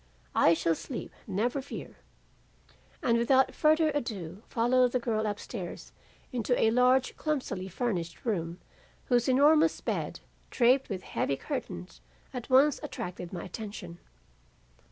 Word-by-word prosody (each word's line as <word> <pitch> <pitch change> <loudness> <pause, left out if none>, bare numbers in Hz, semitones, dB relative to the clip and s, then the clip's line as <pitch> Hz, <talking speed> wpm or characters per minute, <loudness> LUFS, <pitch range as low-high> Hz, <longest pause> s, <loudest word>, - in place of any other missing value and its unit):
'I 165 - +5
shall 165 0 +1
sleep, 235 - -6 0.2
never 230 +7 0
fear,' 275 - -8 1.1
and 235 -2 +3
without 260 +3 +4
further 310 0 +3
ado 205 - -4
followed 245 +1 +3
the 255 - +2
girl 220 -2 -1
upstairs 205 -2 -6 0.4
into 245 -1 0
a 225 - +4
large 250 +2 +3
clumsily 255 -11 -2
furnished 185 -4 -3
room 175 -6 -2 0.5
whose 245 0 +3
enormous 305 +5 +5
bed - - -3 0.3
draped 255 +2 +3
with 190 -3 -4
heavy 135 - -1
curtains 185 - -6 0.3
at 250 -1 -6
once 270 +3 +5
attracted 180 -1 -6
my 175 - -5
attention. 185 -3 -7
235 Hz, 125 wpm, -29 LUFS, 185-260 Hz, 1.1 s, I